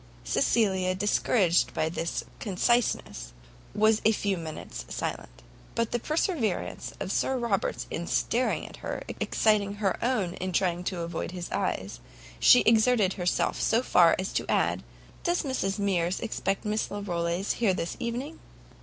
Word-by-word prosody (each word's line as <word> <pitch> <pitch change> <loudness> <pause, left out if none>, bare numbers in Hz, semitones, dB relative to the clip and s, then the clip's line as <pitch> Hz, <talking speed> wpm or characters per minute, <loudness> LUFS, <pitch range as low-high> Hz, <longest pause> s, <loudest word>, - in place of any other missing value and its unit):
Cecilia, 190 - +1
discouraged 185 - +2
by 155 - +1
this 165 0 -3 0.2
conciseness, 205 - 0 0.4
was 215 +1 +4
a 220 - +5
few 205 -2 0
minutes 160 -3 -7
silent; - - -5 0.3
but 230 -1 0
the 240 - 0
perseverance 300 - -1
of 190 - -3
Sir 265 +5 +1
Robert 235 -6 -1
in 170 +1 -3
staring 250 +2 0
at - - -10
her, - - -5 0.2
exciting 205 -2 +2
her 205 -1 -1
own 225 -8 0
in 185 0 -4
trying 175 0 +1
to 180 -2 -2
avoid 170 +1 -4
his 180 -1 -6
eyes, - - -2 0.4
she 250 - +7
exerted 220 -3 +4
herself 180 -1 0
so 230 +3 +2
far 170 -8 +5
as 190 +1 -3
to - - -2
add, - - +1 0.4
"Does 345 0 +1
Mrs 225 -9 -1
Mears 185 -3 0
expect 205 -4 -2
Miss 210 +1 -1
Larolles 180 -2 -2
here 205 -6 +3
this 170 - -3
evening?" 250 +7 -4
200 Hz, 145 wpm, -28 LUFS, 180-230 Hz, 0.4 s, she